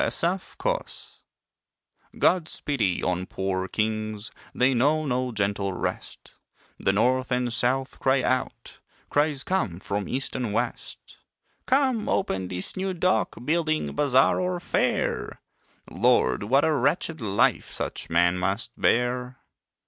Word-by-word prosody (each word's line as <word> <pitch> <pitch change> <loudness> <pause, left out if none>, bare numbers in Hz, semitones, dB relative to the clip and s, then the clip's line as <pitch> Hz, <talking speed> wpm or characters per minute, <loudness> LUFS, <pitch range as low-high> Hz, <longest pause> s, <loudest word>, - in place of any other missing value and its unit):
POOR 180 +3 0 0.2
KINGS - - -4 1.0
God's 175 -3 +1
pity 110 -11 0
on 90 0 -1
poor 95 -1 -2
kings, 110 0 -2 0.2
They 130 +2 +2
know 150 +6 +2
no 125 -2 -1
gentle 100 -2 0
rest; - - -5 0.5
The - - +2
North 130 +6 +1
and 125 -1 0
South 130 +3 0
cry 130 -1 +2
out, 130 0 -2 0.3
Cries 145 -2 +1
come 110 - -1
from 100 -1 -3
East 135 +2 -2
and 120 -5 -2
West - - -4 0.5
"Come, 260 -4 +2
open 95 - 0
this 90 0 -1
new 190 0 -2
Dock, 180 +2 +1
Building, 155 0 0
Bazaar 135 -2 +3
or 180 -1 -1
Fair." - - -1 0.5
Lord, 65 +8 +2
what 135 +6 +3
a 160 - +2
wretched 160 +1 0
life 100 -2 +1
Such - - -3
men 85 +2 +3
must 100 +7 0
bear. 125 +1 +1
125 Hz, 125 wpm, -26 LUFS, 100-155 Hz, 1.0 s, Bazaar